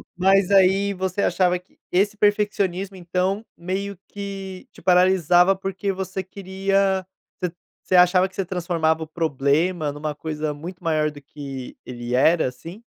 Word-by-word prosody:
Mas 195 +1 +3
aí 195 +1 +4
você 190 +1 -2
achava 180 -1 +2
que 180 - -31
esse 200 +3 +2
perfeccionismo 200 -2 +1
então, 185 +4 -1
meio 190 +2 -4
que 195 -2 -7
te - - -16
paralisava, 180 0 +5
porque 195 +1 -3
você 190 0 -4
queria 195 0 0 0.4
ce 175 - 0 0.3
você 185 - +1
achava 180 +1 +5
que 190 - -21
você 195 - -1
transformava 165 -3 0
o - - -8
problema 155 +1 0
numa 145 0 -4
coisa 150 0 -3
muito 175 +5 -9
maior 155 -2 +1
do 145 -1 -12
que 135 -2 -8
ele 120 0 -4
era, 160 +3 +4
assim? 165 - -9
180 Hz, 150 wpm, -23 LUFS, 160-195 Hz, 0.4 s, paralisava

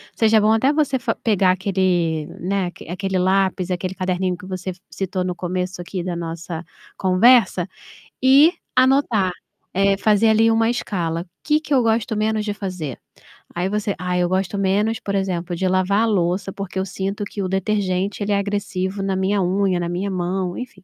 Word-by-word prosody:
seja 220 -1 +4
bom 215 +1 +3
até 260 +5 +3
você 290 -3 +1
fa 240 - -1
pegar 195 -4 +2
aquele, 180 -4 0
né, 185 0 -1 0.2
aquele 190 +2 -2
lápis, 185 0 +1
aquele 180 +1 -3
caderninho 185 -1 -1
que 180 - -12
você 185 0 -4 0.2
citou 190 -1 -3
no 180 0 -2
começo 180 0 -3
aqui 180 0 -5
da 180 -1 -3
nossa 165 0 -5 0.3
conversa, 225 +7 +4 0.5
e 275 +5 +7 0.2
anotar, 255 -7 +3 0.4
eh, 195 +1 +3
fazer 215 +2 +3
ali 225 +1 +4
uma 225 0 +3
escala: 175 -8 -2 0.2
"Que 300 0 +2
que 300 - -3
eu 260 - +5
gosto 225 -1 +1
menos 215 0 0
de 205 - -1
fazer?", 185 - -5 0.6
aí 180 +2 -1
você, 210 0 -1
"Ah, 180 0 -1
eu 180 0 +2
gosto 190 +2 -1
menos, 200 +3 +1
por 200 - -4
exemplo, 180 -3 -2
de 185 +2 0
lavar 185 +2 +2
a - - +3
louça, 195 -2 0
porque 195 -1 -5
eu 190 - -1
sinto 195 +2 -3
que 200 0 -5
o - - -1
detergente, 195 0 -1
ele 205 - -2
é 200 - +3
agressivo 200 -1 -2
na 195 -1 0
minha 190 +2 +1
unha, 185 0 +1
na 170 -1 -2
minha 180 +3 -2
mão", 180 0 -2
enfim. 235 -7 -8
190 Hz, 180 wpm, -21 LUFS, 180-210 Hz, 0.6 s, e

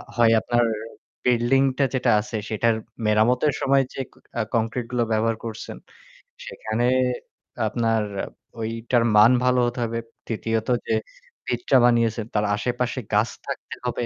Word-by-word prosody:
হয় 115 -2 +5
আপনার 120 0 +2 0.6
বিল্ডিং 125 +2 +3
টা 140 - +3
যেটা 125 -1 +2
আছে 110 +1 -5
সেটার 115 +1 +2 0.3
মেরামতের 120 +7 +3
সময় 135 0 +4
যে - - -3 0.4
আ - - +3
কংক্রিট 115 +2 -1
গুলো 120 -1 +1
ব্যবহার 110 +1 +1
করছেন, 110 -1 -6 0.7
সেখানে 120 - -2 0.8
আপনার 115 -1 +1 0.6
ঐটার 115 +2 0
মান 110 +4 +8
ভালো 125 0 +3
হতে 120 +1 -4
হবে। 115 +1 -3 0.3
৩য় 115 +1 -1
ত - - -4 0.2
যে - - +2 0.5
ভিতটা 365 - +2
বানিয়েছেন 115 -2 +2
তার 105 0 +2
আশেপাশে 125 +3 -2
গাছ 105 +2 +3 0.2
থাকতে - - -5
হবে। 120 - -1
115 Hz, 135 wpm, -24 LUFS, 110-125 Hz, 0.8 s, মান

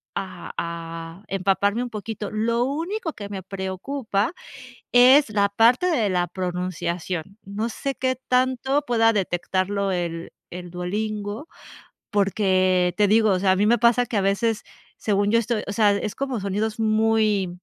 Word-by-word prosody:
a 185 -2 -6
a 165 +1 -6
empaparme 195 +4 +1
un 250 - -5
poquito. 210 0 -5
Lo 230 +2 +1
único 325 +6 -3
que 205 -1 -8
me 195 -2 -6
preocupa, 195 - -3 0.6
es 255 +3 +7
la 205 -1 +2
parte 235 - +4
de 255 - +2
la 180 -2 +1
pronunciación, 180 0 -4
no 205 +4 -3
sé 275 +3 -4
qué 260 0 0
tanto 260 +2 +1
pueda 225 -2 +3
detectarlo 195 0 -1
el 170 -2 -3 0.2
el 180 0 -8
Duolingo, 205 - -4 0.6
porque, 185 -3 +2
te 210 - +4
digo, 220 +1 +4
o 185 - +2
sea, 190 0 +3
a - - +2
mí 205 +2 +2
me 235 +2 +5
pasa 240 +2 +3
que 225 - -3
a - - +3
veces, 205 +3 0 0.3
según 205 -1 0
yo, 230 - +5
estoy 225 -1 -2
O 200 - -4
sea, 210 0 +4
es 205 +1 -3
como 270 -3 -3
sonidos 210 +3 -2
muy 215 -4 +1
205 Hz, 155 wpm, -23 LUFS, 185-230 Hz, 0.6 s, es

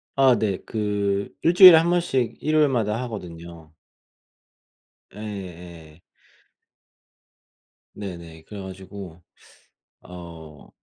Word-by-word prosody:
아 135 -2 +5
네 100 -4 -1
그 100 -2 -2
1 170 - +2
주일에 185 -2 +11
1 165 +2 +2
번씩 130 -10 0
일요일마다 135 -8 +1
하거든요. 85 -7 -9 1.4
예예. 90 -6 -10 1.9
네네 85 -5 -9
그래 100 +1 -10
가지고 95 -2 -10 0.8
어 85 -4 -12
100 Hz, 150 characters per minute, -23 LUFS, 85-115 Hz, 1.9 s, 주일에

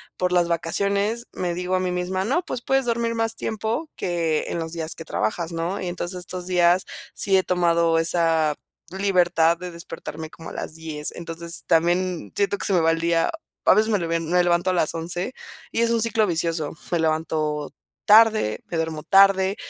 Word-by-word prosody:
por 180 0 -1
las 175 -1 +3
vacaciones, 200 +7 -1
me 175 -2 -2
digo 180 +1 -2
a 185 - +1
mí 185 - -1
misma: 180 +1 -2
"No, 280 - 0
pues, 240 - -4
puedes 270 +1 +1
dormir 235 -1 0
más 225 0 -1
tiempo 225 +9 -3
que 165 -3 -1
en - - -3
los 160 0 -4
días 160 -1 -4
que 165 - -8
trabajas, 160 +6 -2
¿no?". 170 +4 -3
Y 180 - -3
entonces 175 +1 -4
estos 180 0 -7
días 180 0 +3 0.3
sí 195 - +1
he 185 - +2
tomado 170 -2 +2
esa, 165 -2 +2 0.3
libertad 175 -3 +2
de 180 +1 -7
despertarme 160 -2 -8
como 165 - -10
a - - -10
las 155 - -6
10:00 155 -2 -3
entonces 170 0 -1
también, 175 - +1
siento 200 0 +1
que - - -3
se - - 0
me 180 - +4
va 165 - +3
el 165 - -1
día, 170 - +2 0.3
a - - +7
veces 215 +3 +2
me 205 - +2
le 170 - -3
me 175 +2 +2
levanto 175 +1 +2
a - - +1
las 170 -4 +1
11:00 175 +8 -3 0.4
y 230 - +1
es 235 - +3
un 230 -1 +2
ciclo 225 -1 +2
vicioso. 165 -2 -1 0.2
Me 170 - +1
levanto 155 -2 -1 0.3
tarde, 215 - +5
me - - -6
duermo 160 -1 -3
tarde, 195 0 +5
175 Hz, 200 wpm, -23 LUFS, 165-195 Hz, 0.4 s, a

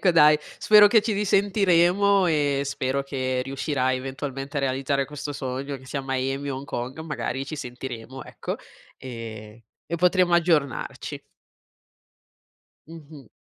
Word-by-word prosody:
Ecco 185 - +4
dai, 150 -2 +6 0.2
spero 210 -1 +7
che 220 +2 +5
ci 220 0 -1
risentiremo 195 -1 +3
e 145 -3 +1
spero 135 0 -1
che 130 -2 -2
riuscirai 130 -1 -1
eventualmente 135 +1 -5
a - - +1
realizzare 135 +1 0
questo 145 0 -6
sogno, 135 +1 -4
che 130 - -15
sia 140 - -3
a - - -4
Miami 135 +2 -2
o 130 - -3
Hong 135 - -7
Kong, 130 0 -5
magari 135 -4 -3
ci 155 +3 -6
sentiremo, 125 -1 -7
ecco, - - -6 0.4
e 115 -3 -9 0.2
e 170 - -3
potremo 180 0 +3
aggiornarci. 160 -5 0 1.7
Mh-mh. 150 -6 -12
140 Hz, 140 wpm, -25 LUFS, 130-165 Hz, 1.7 s, spero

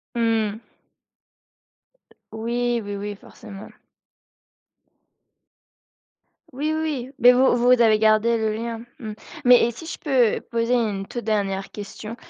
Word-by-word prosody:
Mmh 225 -2 +1
mh. 220 +3 -14 1.6
Oui, 235 +1 -1
oui, 205 0 -5
oui, 205 +1 -5
forcément. 195 0 -12 2.8
Oui, 295 +4 -2
oui, 315 - -2
oui, 270 -5 -4
mais 245 +1 +8
vous 255 0 +4
vous 245 +1 +3
avez 220 -2 +5
gardé 220 +2 +3
le 220 -1 -1
lien. 230 0 -5 0.2
Mmh. 215 -2 -6 0.3
Mais 245 -2 +6
et 235 - -1
si 320 +8 -11
je - - -6
peux 255 -7 +2
poser 230 +1 +1
une 205 -5 -1
toute 240 - -6
dernière 195 -3 -2
question, 210 +2 -8
230 Hz, 130 wpm, -23 LUFS, 215-245 Hz, 2.8 s, mais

